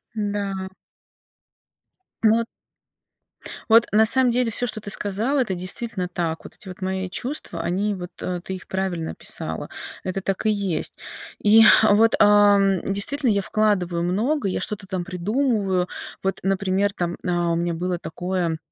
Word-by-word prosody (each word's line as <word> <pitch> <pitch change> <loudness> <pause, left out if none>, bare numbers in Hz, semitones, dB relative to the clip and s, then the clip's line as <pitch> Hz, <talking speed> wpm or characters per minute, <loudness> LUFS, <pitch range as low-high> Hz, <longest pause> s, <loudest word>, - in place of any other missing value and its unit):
Н-да. 200 -2 -3 1.6
Вот. 225 +1 +4 1.2
Вот, 225 +1 +7
на 220 +2 +5
самом 250 +2 +3
деле 245 -1 +1
всё, 245 +3 0
что 215 - -4
ты 205 - -7
сказала- 215 +9 0
это 205 -7 -1
действительно 185 +2 -2
так. 170 -2 -3
Вот - - -11
эти 195 - -12
вот 185 +2 -10
мои 190 0 -2
чувства- 240 - -3
они 200 +5 -1
вот, 180 -1 -7
э, 180 -1 -3
ты 190 - -5
их 185 - -11
правильно 185 -4 -3
описала, - - -4 0.3
это 185 +1 -3
так 195 +3 -3
и 215 - +4
есть. 200 -5 -1 0.5
И, 220 +2 +7
э, 215 -1 +6
вот, 225 +2 +4
ам, 205 -2 +5
действительно, 235 +8 +2
я 200 - +1
вкладываю 185 -5 0
много, 215 - 0
я 185 - -2
что-то 205 -2 -5
там 185 -2 -3
придумываю. 195 0 0 0.4
Вот, 195 0 -1
например, 195 +1 0
там, 175 -1 -3
а, 175 -1 0
у 165 - +1
меня 170 0 -1
было 180 +2 -2
такое 175 -1 -3
195 Hz, 155 wpm, -23 LUFS, 180-215 Hz, 1.6 s, Вот